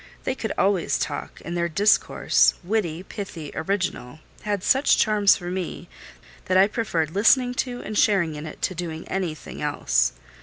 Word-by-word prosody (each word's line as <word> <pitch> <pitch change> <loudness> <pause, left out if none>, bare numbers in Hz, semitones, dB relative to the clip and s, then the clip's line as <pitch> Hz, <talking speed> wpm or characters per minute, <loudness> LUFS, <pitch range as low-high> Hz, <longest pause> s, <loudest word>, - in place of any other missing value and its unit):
They - - -1
could 225 -5 -4
always 190 -3 +1
talk; - - -4
and 170 - -4
their 170 0 0
discourse, 200 +6 +3
witty, 180 -4 -1
pithy, 175 -7 -7
original, 185 -8 -3 0.2
had 205 -3 -2
such 270 +2 +4
charms 210 -2 +4
for 175 -1 -6
me, 180 -1 -5 0.6
that 185 - +2
I 190 - +7
preferred 200 -8 -1
listening 245 +6 +4
to, 245 -1 -6
and 215 - -6
sharing 195 -7 +3
in 150 +1 -7
it, - - -11
to - - 0
doing 165 -2 -6
anything 180 -5 -4
else. 65 - +1
185 Hz, 160 wpm, -24 LUFS, 160-210 Hz, 0.6 s, I